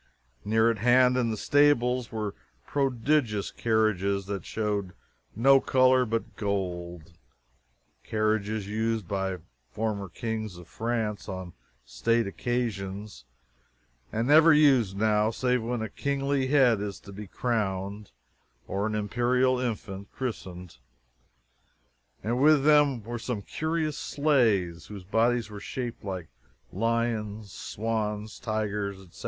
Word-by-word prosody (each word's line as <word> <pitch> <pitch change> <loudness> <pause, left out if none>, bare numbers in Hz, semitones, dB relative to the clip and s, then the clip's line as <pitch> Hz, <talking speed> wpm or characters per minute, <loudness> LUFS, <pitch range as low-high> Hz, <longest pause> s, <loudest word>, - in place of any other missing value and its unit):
Near 110 +2 +3
at 110 - -5
hand, 125 +2 +5
in 125 -2 +1
the 110 - -2
stables, 125 -3 +3
were 105 -3 -3 0.3
prodigious 130 -5 0
carriages 100 -4 +1
that 100 -3 -5
showed 105 -4 -2 0.4
no 135 +5 +6
color 130 -1 +4
but 115 +1 -3
gold 90 -5 -3 0.9
carriages 110 -1 -1
used 110 -1 -1
by 95 -1 -2 0.3
former 105 -3 -3
kings 110 -3 -4
of 90 -1 -12
France 110 -2 -3
on 95 -2 -6 0.3
state 115 - +1
occasions, 100 - -3 0.9
and 115 +2 -1
never 160 +3 +7
used 135 -10 +4
now 105 0 +2
save 125 +1 0
when 115 0 -2
a - - -2
kingly 140 +2 -1
head 130 -6 +4
is 100 -1 -4
to 100 - -12
be 100 +1 -8
crowned 100 -3 -2 0.6
or 100 +2 -1
an 110 - -2
imperial 125 +4 +1
infant 105 -5 -4
christened. 90 - -6 1.4
And 120 +4 0
with 150 -1 +5
them 145 -6 +4
were 120 +2 -5
some 115 -3 -4
curious 155 +1 -2
sleighs, 110 - +1
whose 100 -3 -9
bodies 115 +3 +1
were 105 - -7
shaped 120 +3 -5
like 95 -5 -5 0.5
lions, 110 -1 -1
swans, 105 -1 -3
tigers, 105 -3 -2
etc. 95 -2 -15
110 Hz, 120 wpm, -27 LUFS, 100-125 Hz, 1.4 s, never